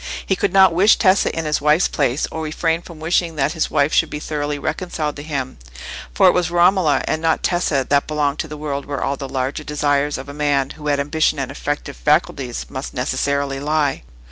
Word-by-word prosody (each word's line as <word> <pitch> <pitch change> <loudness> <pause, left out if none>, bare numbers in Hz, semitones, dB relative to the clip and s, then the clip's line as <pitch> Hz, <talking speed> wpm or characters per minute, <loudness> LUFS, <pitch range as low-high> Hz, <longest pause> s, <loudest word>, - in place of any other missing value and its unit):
He - - +1
could - - 0
not 190 -2 +6
wish 195 +6 +5
Tessa 190 -1 +3
in 165 - -2
his 150 -1 0
wife's 150 +4 +3
place, 140 0 0
or 160 - -4
refrain 160 +1 -1
from 170 -2 -12
wishing 165 +1 0
that 140 0 0
his 160 -2 -1
wife 145 0 +1
should - - +3
be 150 - -5
thoroughly 150 -1 -3
reconciled 155 0 -3
to - - -6
him; 140 - -4 0.5
for 195 - +3
it - - +7
was 180 -1 +1
Romola, 175 -2 +3
and 155 - -1
not 165 -1 +1
Tessa, 160 -7 +1
that 140 0 +2
belonged 150 -2 -1
to - - -2
the 150 0 -8
world 140 -2 -4
where 145 -2 -3
all 140 - -1
the 135 -1 -7
larger 135 +3 -3
desires 145 -1 0
of 135 - -8
a 140 - -8
man 145 -2 0
who 150 -1 -8
had 145 -1 +1
ambition 155 +2 +1
and 135 -1 -3
effective 145 +1 -4
faculties 120 - 0
must 130 +2 -7
necessarily 135 +2 -1
lie. 150 0 0
150 Hz, 215 wpm, -20 LUFS, 140-160 Hz, 0.5 s, it